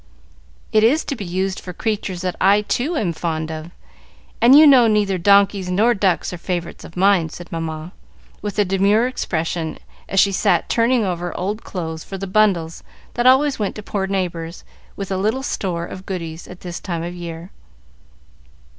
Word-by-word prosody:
"It 215 - +4
is 275 +8 +3
to 280 - -3
be 210 - -6
used 185 +2 -2
for 180 - -8
creatures 200 -3 -3
that 185 -1 -2
I, 200 +2 +4
too, 275 +10 -1
am 180 -10 0
fond 160 -1 -3
of, 155 +1 -6 0.7
and 250 +4 +8
you 310 - +9
know 260 -5 +7
neither 205 -3 +1
donkeys 200 0 +4
nor 215 +7 +3
ducks 190 -4 0
are 175 - -7
favorites 175 -1 -4
of 165 - -12
mine," 190 -3 +3
said 175 +2 -11
Mamma, 160 0 -5 0.5
with 205 0 -5
a 205 - +3
demure 200 +4 +3
expression, 165 -9 -2 0.3
as 195 - +2
she 200 - +5
sat 190 - +1
turning 235 -1 +2
over 175 -2 -3
old 205 +5 -3
clothes 160 -3 -5
for 195 - -7
the 195 - -5
bundles 185 -5 +1 0.3
that 240 +1 +1
always 265 +1 +4
went 205 -2 -2
to 210 - -8
poor 195 -1 -2
neighbors, 175 -3 -3 0.3
with 195 -1 -6
a 190 - 0
little 220 +7 0
store 175 -9 -2
of 185 +2 -10
goodies, 165 -3 -5
at 180 - -12
this 175 -1 -6
time 170 -3 -4
of 175 +1 -5
the 180 - -10
year. 170 +1 -7
190 Hz, 185 wpm, -20 LUFS, 170-210 Hz, 0.7 s, you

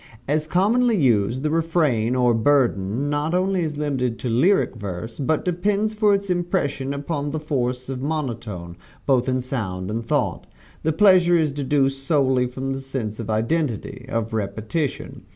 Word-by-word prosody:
As 150 +2 0
commonly 220 +7 +3
used, 120 - +2
the 155 - 0
refrain, 155 -8 +1
or 125 -2 +3
burden, 115 -1 +2
not 145 +3 0
only 185 0 +1
is 155 -3 -3
limited 130 -5 -1
to 125 - -4
lyric 145 - +3
verse, 105 +1 -6
but 155 +2 0
depends 200 +4 0
for 210 -1 +3
its 200 -1 -2
impression 175 -7 -1
upon 145 +1 -3
the 155 +2 -3
force 130 -4 -2
of 130 -1 -4
monotone 115 - -4 0.3
both 130 -2 +2
in 130 0 0
sound 105 -7 -4
and 115 +2 -2
thought. 115 - -1 0.3
The 160 - +1
pleasure 180 -1 +5
is 155 -4 +1
deduced 135 -1 0
solely 130 -4 +2
from 130 +2 -4
the 135 - -5
sense 125 -5 -4
of 115 -2 -5
identity 125 +2 -1
of 115 -3 -2
repetition. 110 +7 -3
135 Hz, 160 wpm, -23 LUFS, 120-160 Hz, 0.3 s, pleasure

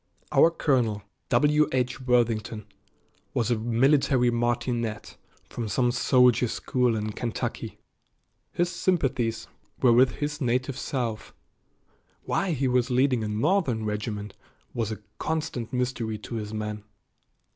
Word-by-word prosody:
Our 165 - +6
colonel, 125 - 0 0.3
W. 150 0 +4
H. 125 0 -1
Worthington, 115 -4 0 0.7
was 120 +1 +1
a 115 - +1
military 125 +2 +3
martinet 120 -2 -2 0.3
from 115 -2 -5
some 125 +2 +2
soldier 125 -1 +4
school 125 +1 0
in 105 0 -2
Kentucky. 115 +1 -4 0.7
His 175 0 0
sympathies 125 -13 0 0.3
were 125 -3 +5
with 125 +1 +5
his 150 +1 -4
native 130 +1 0
South. 120 -6 -3 0.9
Why 195 -3 0
he 135 -2 0
was 125 0 +2
leading 125 -2 +2
a - - -2
Northern 115 - +1
regiment 105 -1 -4 0.4
was 115 -2 -2
a 105 -1 -7 0.2
constant 155 -7 -3
mystery 125 -3 -2
to 105 - -9
his 105 -2 -4
men. 105 -1 -4
120 Hz, 125 wpm, -26 LUFS, 110-130 Hz, 0.9 s, Our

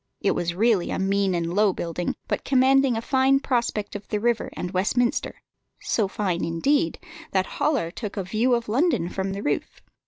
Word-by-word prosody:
It - - +1
was 170 0 -2
really 215 -2 +2
a - - -2
mean 195 0 +1
and 170 0 -2
low 205 0 +3
building, 175 +1 -3
but - - -2
commanding 265 -1 +3
a 225 - -4
fine 270 +1 +3
prospect 235 -6 -1
of 205 0 -7
the 210 - -1
river 235 +1 0
and 180 - -5
Westminster, 215 +6 0 0.4
so 215 -4 0
fine, 190 -3 -2
indeed, 165 - +1 0.4
that 190 -1 +2 0.2
Hollar 250 - +1
took 210 +2 -6
a 195 - -1
view 225 +7 +1
of 235 0 -3
London 245 - +1
from 190 +1 -3
the 200 - -5
roof. 145 - -2
210 Hz, 185 wpm, -24 LUFS, 185-245 Hz, 0.4 s, low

